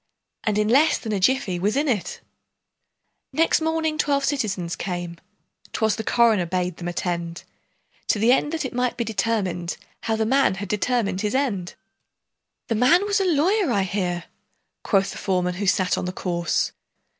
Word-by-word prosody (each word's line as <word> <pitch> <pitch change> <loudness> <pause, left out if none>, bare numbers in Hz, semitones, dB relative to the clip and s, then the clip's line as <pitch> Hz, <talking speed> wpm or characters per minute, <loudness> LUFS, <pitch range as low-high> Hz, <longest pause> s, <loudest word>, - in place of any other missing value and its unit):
And 210 -1 +1
in 210 0 +2
less 280 +8 +4
than 220 - -5
a 200 - 0
jiffy 195 -4 +1
was 205 +7 0
in 295 +2 +1
it! 205 - -2 1.1
Next 325 +3 +3
morning 320 -1 0
twelve 280 -2 +1
citizens 200 - -1
came 175 -2 -5 0.5
('Twas 220 -1 +1
the 220 - -4
coroner 220 -6 +3
bade 180 0 -2
them 175 - -6
attend), 170 -1 -3 0.6
To - - +2
the 225 +4 +4
end 290 +3 +2
that 325 -4 -2
it - - -5
might 250 0 -1
be 235 - 0
determined 190 -5 -1 0.2
How 225 - -1
the 220 0 0
man 270 -3 +3
had 195 0 -6
determined 210 -2 0
his 210 +3 -1
end! 205 -11 -1 0.9
"The - - 0
man 305 - +4
was 410 0 +1
a 390 - +1
lawyer, 345 - +2
I 200 -4 +2
hear," 180 -3 -2 0.6
Quoth 195 -2 +2
the - - -8
foreman 180 -2 0
who 195 +3 -3
sat 185 0 +2
on - - -3
the 180 - -3
corse. 175 -3 -1
210 Hz, 175 wpm, -23 LUFS, 180-265 Hz, 1.1 s, less